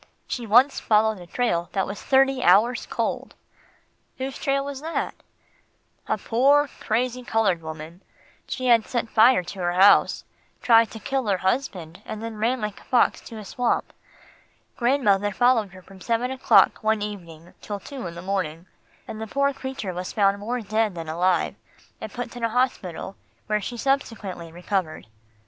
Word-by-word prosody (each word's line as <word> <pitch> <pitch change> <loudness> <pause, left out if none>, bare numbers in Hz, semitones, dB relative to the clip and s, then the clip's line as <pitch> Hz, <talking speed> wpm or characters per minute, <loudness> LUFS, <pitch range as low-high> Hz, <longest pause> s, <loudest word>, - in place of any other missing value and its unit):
She 240 -2 -4
once 245 +6 +5
followed 215 -1 +2
a 175 - -11
trail 175 -5 -1
that 195 - 0
was 200 - -7
thirty 270 -1 +3
hours 215 +8 +4
cold." - - -3 0.8
"Whose 265 +1 -4
trail 275 0 -1
was 280 -1 -6
that?" 325 +2 -3 0.9
"A - - 0
poor, 280 +5 +3
crazy, 245 +3 -1
coloured 220 -8 +1
woman. 160 +2 -9 0.5
She 255 - -4
had 235 -3 +4
set 235 -2 -2
fire 225 -3 +5
to 190 +2 -9
her 175 -1 0
house, 195 +3 +5 0.4
tried 230 -2 +5
to 220 - -9
kill 265 0 -2
her 195 -2 +2
husband, 185 -5 -2
and 215 +1 -7
then 225 -1 -6
ran 240 +3 0
like 210 -1 -4
a - - -18
fox 245 -2 +2
to 225 - -10
a 215 - -8
swamp. 245 +3 -1 0.8
Grandmother 210 -6 +2
followed 235 0 +2
her 185 0 -14
from 190 0 -16
seven 235 +5 -1
o'clock 265 0 +4
one 220 -1 +1
evening 175 -5 -8
till 205 -1 -5
two 275 +5 -9
the - - -3
next 170 +1 -9
morning, 180 -4 -2 0.4
and 220 - -7
the 220 - -4
poor 280 +4 +1
creature 265 -8 -5
was 180 +1 -5
found 200 -1 +2
more 235 +4 -3
dead 215 -1 0
than 165 -2 -6
alive, 175 +2 +1 0.5
and - - -6
put 245 -1 -6
in 240 - -7
a 230 - +2
hospital 220 -6 -2 0.3
where 210 0 0
she 240 +4 -5
subsequently 220 -10 -2
recovered." 175 -1 -3
220 Hz, 170 wpm, -24 LUFS, 185-245 Hz, 0.9 s, once